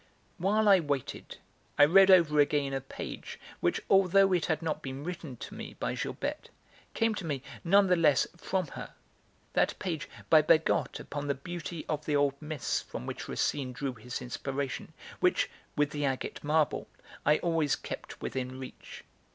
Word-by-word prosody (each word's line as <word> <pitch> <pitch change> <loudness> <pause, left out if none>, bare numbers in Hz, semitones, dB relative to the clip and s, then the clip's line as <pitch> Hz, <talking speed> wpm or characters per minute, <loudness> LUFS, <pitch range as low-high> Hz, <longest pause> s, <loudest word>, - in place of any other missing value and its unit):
While 210 +4 +2
I 195 -2 +8
waited 145 -5 -3 0.4
I 145 - +9
read 190 +5 +7
over 165 -5 +6
again 145 -1 +2
a 135 - -1
page 135 - -7 0.2
which, - - +1
although 195 0 +5
it 175 -4 +1
had 160 -1 0
not 155 -1 -2
been 135 0 -6
written 165 -5 -6
to - - -8
me - - -8
by - - -1
Gilberte, - - -4 0.5
came 225 0 +2
to 210 - -5
me, 145 -5 -3 0.2
none 195 +3 +5
the 180 -1 +4
less, 155 -5 +4
from 185 +1 -1
her, - - -8 0.6
that - - +2
page 165 -5 -4 0.2
by 155 -1 +7
Bergotte 160 +1 +2
upon 145 0 -5
the 140 - +1
beauty 170 +3 -6
of 150 -1 -2
the 150 - +1
old 145 -1 +3
myths 150 -4 -2
from - - -7
which - - -5
Racine 130 -3 -1
drew 135 +1 -3
his 125 +2 -6
inspiration, 135 +2 -4 0.3
which - - +2 0.2
(with 150 0 +2
the 145 0 -3
agate 135 -2 -2
marble) 150 0 +1 0.4
I 150 - +4
always 165 -4 +1
kept - - -8
within 130 0 -3
reach. 130 - -10
150 Hz, 170 wpm, -30 LUFS, 140-175 Hz, 0.6 s, I